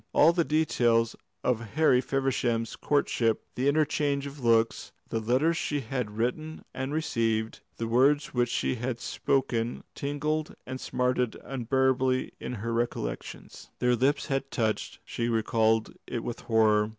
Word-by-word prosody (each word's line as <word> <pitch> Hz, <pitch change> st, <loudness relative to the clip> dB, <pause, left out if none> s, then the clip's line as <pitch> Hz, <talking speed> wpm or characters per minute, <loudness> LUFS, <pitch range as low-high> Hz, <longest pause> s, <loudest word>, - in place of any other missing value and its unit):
All 165 Hz, +3 st, +6 dB
the 170 Hz, -1 st, +2 dB
details 120 Hz, -8 st, +2 dB, 0.3 s
of 125 Hz, -3 st, +2 dB, 0.2 s
Harry 155 Hz, -5 st, +5 dB
Feversham's 125 Hz, -4 st, 0 dB
courtship, 120 Hz, -6 st, +1 dB
the 130 Hz, +3 st, 0 dB
interchange 145 Hz, -1 st, +1 dB
of 140 Hz, -1 st, -8 dB
looks, 115 Hz, -1 st, +2 dB, 0.2 s
the 115 Hz, -, -1 dB
letters 130 Hz, +9 st, +2 dB
she 145 Hz, -1 st, -1 dB
had 120 Hz, -4 st, -4 dB
written 155 Hz, +7 st, -2 dB
and 130 Hz, +1 st, -3 dB
received, 115 Hz, -7 st, 0 dB, 0.2 s
the 115 Hz, -, -2 dB
words 140 Hz, +5 st, +3 dB
which 120 Hz, -1 st, +1 dB
had 120 Hz, -, -1 dB
been -, -, -24 dB
spoken, 120 Hz, -2 st, -1 dB
tingled 150 Hz, +2 st, -2 dB
and 130 Hz, 0 st, -6 dB
smarted 125 Hz, -2 st, 0 dB
unbearably 130 Hz, 0 st, +1 dB
in -, -, -5 dB
her 115 Hz, +1 st, -3 dB
recollections. 115 Hz, -, -4 dB
Their 125 Hz, 0 st, +3 dB
lips 135 Hz, +4 st, +1 dB
had 135 Hz, -1 st, -2 dB
touched 110 Hz, -6 st, -1 dB
she 115 Hz, 0 st, -2 dB
recalled 110 Hz, -1 st, +2 dB
it 115 Hz, -, -3 dB
with 120 Hz, -, -4 dB
horror. 110 Hz, -2 st, +3 dB
125 Hz, 140 wpm, -28 LUFS, 115-140 Hz, 0.3 s, All